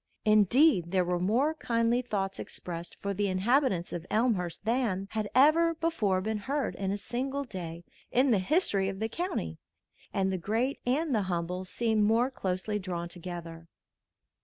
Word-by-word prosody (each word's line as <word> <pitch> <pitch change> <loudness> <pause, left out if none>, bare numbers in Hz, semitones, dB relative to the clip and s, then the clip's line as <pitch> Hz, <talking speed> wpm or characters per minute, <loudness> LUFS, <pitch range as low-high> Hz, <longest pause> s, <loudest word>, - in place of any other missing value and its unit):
Indeed, 215 - +4
there 185 0 +2
were 175 0 0
more 240 - +2
kindly 235 -4 +1
thoughts 195 -5 -3
expressed 170 -1 -6
for 200 0 -2
the 205 +1 0
inhabitants 195 - +1
of 175 +1 -5
Elmhurst 205 -6 0
than 220 -5 0
had 215 -2 -2
ever 325 +5 +5
before 230 - 0
been 215 +2 -2
heard 275 +6 -2
in 195 -1 -3
a 200 - -1
single 260 +7 -3
day 175 -8 -7 0.3
in 255 +1 +3
the 210 - +4
history 195 - +2
of 195 - -5
the 220 - 0
county, 210 - -3 0.5
and 190 -1 0
the 185 - -2
great 230 +9 -1
and 290 +3 +1
the 215 - +2
humble 180 +1 -2
seemed 220 +2 0
more 230 +5 +3
closely 195 -1 -2
drawn 175 -3 -4
together. 170 -2 -7
205 Hz, 160 wpm, -29 LUFS, 185-250 Hz, 0.5 s, ever